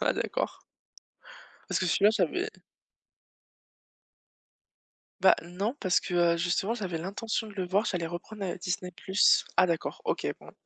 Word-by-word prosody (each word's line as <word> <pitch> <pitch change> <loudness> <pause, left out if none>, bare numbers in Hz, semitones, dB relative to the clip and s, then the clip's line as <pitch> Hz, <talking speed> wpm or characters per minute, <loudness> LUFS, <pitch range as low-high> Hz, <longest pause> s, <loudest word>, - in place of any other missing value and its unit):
Ah - - +2
d'accord. - - -2 1.1
Parce - - +1
que 185 - +1
celui-là 200 +4 +4
j'avais 370 - 0 2.7
Bah, - - +7
non 195 +8 -3
parce 185 -2 +3
que, 180 - -6
heu, 170 -1 +4
justement, 180 +6 0
j'avais 185 -8 -3
l'intention 215 +6 -3
de 210 - -11
le 190 -2 -2
voir, 200 +5 +1
j'allais 175 -3 -1
reprendre, 185 +5 -6
heu, 185 - -3
Disney+. 180 0 -3 0.6
Ah 185 - +6
d'accord, 170 -2 -2
OK, - - -1
bon. - - -14
185 Hz, 140 wpm, -29 LUFS, 175-210 Hz, 2.7 s, Bah